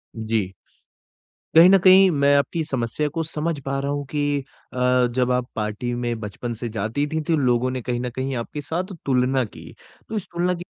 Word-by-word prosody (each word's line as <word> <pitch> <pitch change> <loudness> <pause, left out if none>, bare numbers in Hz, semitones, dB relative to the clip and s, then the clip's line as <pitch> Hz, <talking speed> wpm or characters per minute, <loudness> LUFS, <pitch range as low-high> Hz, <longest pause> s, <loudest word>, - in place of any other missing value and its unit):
जी। 110 -4 -2 1.0
कहीं 170 +3 +9
न 195 - +7
कहीं 190 0 +8
मैं 140 -2 +3
आपकी 160 +3 0
समस्या 135 0 -2
को 165 - 0
समझ 160 0 -3
पा 135 +1 -3
रहा 140 +1 -2
हूँ 145 0 -3
कि 145 -1 0 0.3
अ, - - -7 0.4
जब 125 -1 +2
आप 125 -1 0
पार्टी 105 +3 -3
में 120 -1 -2
बचपन 110 +3 -5
से 120 - -4
जातीं 110 +7 -2
थीं 160 - 0
तो 165 - +3
लोगों 125 -2 +2
ने 130 0 -3
कहीं 120 +1 -2
न 125 0 -3
कहीं 130 +1 -2
आपके 120 +5 -5
साथ 180 +6 -4
तुलना 130 0 +2
की 105 - -12 0.4
तो 220 - -4
इस 205 -3 -2
तुलना 175 +1 +1
की 175 0 -6
135 Hz, 200 wpm, -23 LUFS, 120-160 Hz, 1.0 s, कहीं